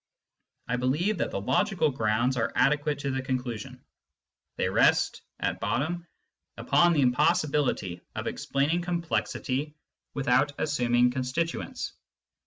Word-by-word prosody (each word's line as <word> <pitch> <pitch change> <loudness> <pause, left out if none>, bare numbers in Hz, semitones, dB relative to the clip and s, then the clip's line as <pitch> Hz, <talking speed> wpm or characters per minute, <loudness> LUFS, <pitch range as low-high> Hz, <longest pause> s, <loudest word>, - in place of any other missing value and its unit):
I 125 - 0
believe 150 +11 0
that - - 0
the - - -3
logical 180 - +1
grounds 120 +1 +1
are 120 - 0
adequate 145 +2 +2
to 140 - -1
the 130 0 -1
conclusion. 125 -4 -4 0.7
They - - +1
rest, - - +3 0.2
at - - -1
bottom, 170 +6 -2 0.5
upon 175 0 +4
the 150 - +3
impossibility 140 - +1
of - - -4
explaining 145 +5 0
complexity 160 -4 -2 0.4
without 135 +1 +2
assuming 125 -4 +2
constituents. 130 +6 -3
140 Hz, 115 wpm, -27 LUFS, 125-160 Hz, 0.7 s, upon